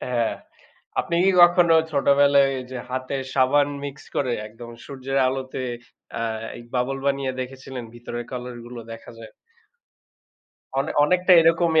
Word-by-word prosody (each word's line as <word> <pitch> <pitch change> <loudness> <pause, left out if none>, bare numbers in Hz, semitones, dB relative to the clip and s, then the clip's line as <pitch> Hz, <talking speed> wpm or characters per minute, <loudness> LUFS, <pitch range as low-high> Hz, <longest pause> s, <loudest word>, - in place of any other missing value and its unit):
হ্যাঁ। 120 -3 -1 0.7
আপনি 170 - -1
কি 195 - +5
কখনো 175 -1 +5 0.2
ছোটবেলায় 140 -1 +4
ঐযে 130 0 -7
হাতে 130 +1 -3 0.2
সাবান 140 +2 +3 0.2
মিক্স 140 -1 -7
করে 130 -3 0 0.2
একদম 115 +2 -11 0.2
সূর্যের 135 -1 -4
আলোতে 130 0 -3 0.6
আ - - -2 0.5
বাবল 125 +2 0
বানিয়ে 140 -1 0
দেখেছিলেন? 130 0 -7
ভিতরের 120 0 -6
কালার 125 -1 -6
গুলো 120 0 -8
দেখা 115 - -10
যায়? 110 -1 -11 1.5
অনে 135 - -1
অনেকটা 180 +3 +3
এরকমই 165 0 +4
135 Hz, 125 wpm, -23 LUFS, 125-145 Hz, 1.5 s, কি